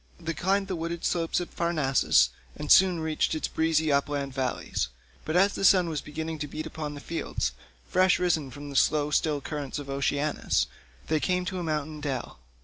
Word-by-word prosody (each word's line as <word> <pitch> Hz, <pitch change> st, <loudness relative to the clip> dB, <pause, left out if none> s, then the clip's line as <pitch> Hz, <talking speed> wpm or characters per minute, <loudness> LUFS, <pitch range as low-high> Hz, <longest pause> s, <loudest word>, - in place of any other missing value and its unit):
They 165 Hz, -1 st, -3 dB
climbed 195 Hz, +3 st, +1 dB
the 190 Hz, -, -2 dB
wooded 170 Hz, 0 st, -4 dB
slopes 165 Hz, -1 st, +1 dB
of 175 Hz, -, -7 dB
Parnassus 155 Hz, -6 st, +3 dB, 0.2 s
and 150 Hz, -, -3 dB
soon 185 Hz, -3 st, +6 dB
reached 160 Hz, 0 st, 0 dB
its 155 Hz, -, -1 dB
breezy 160 Hz, -1 st, +1 dB
upland 140 Hz, -1 st, 0 dB
valleys; 130 Hz, -, -2 dB, 0.4 s
but 155 Hz, -, -2 dB
as 195 Hz, +3 st, +4 dB
the -, -, -4 dB
sun 185 Hz, -3 st, +5 dB
was 155 Hz, -2 st, -2 dB
beginning 160 Hz, +1 st, -5 dB
to 150 Hz, -, -3 dB
beat 155 Hz, +2 st, -5 dB
upon 150 Hz, -2 st, -5 dB
the -, -, -7 dB
fields, 140 Hz, -, -2 dB, 0.4 s
fresh 185 Hz, 0 st, +4 dB
risen 160 Hz, -6 st, +1 dB
from 145 Hz, +2 st, -8 dB
the -, -, -8 dB
slow 150 Hz, +1 st, +3 dB
still 150 Hz, -1 st, +1 dB
currents 145 Hz, -1 st, -4 dB
of 140 Hz, -1 st, -6 dB
Oceanus, 145 Hz, +2 st, 0 dB, 0.4 s
they 155 Hz, 0 st, +1 dB
came 180 Hz, +3 st, 0 dB
to 185 Hz, 0 st, -3 dB
a -, -, -3 dB
mountain 155 Hz, -1 st, -3 dB
dell. 135 Hz, -4 st, -4 dB
155 Hz, 190 wpm, -27 LUFS, 145-170 Hz, 0.4 s, soon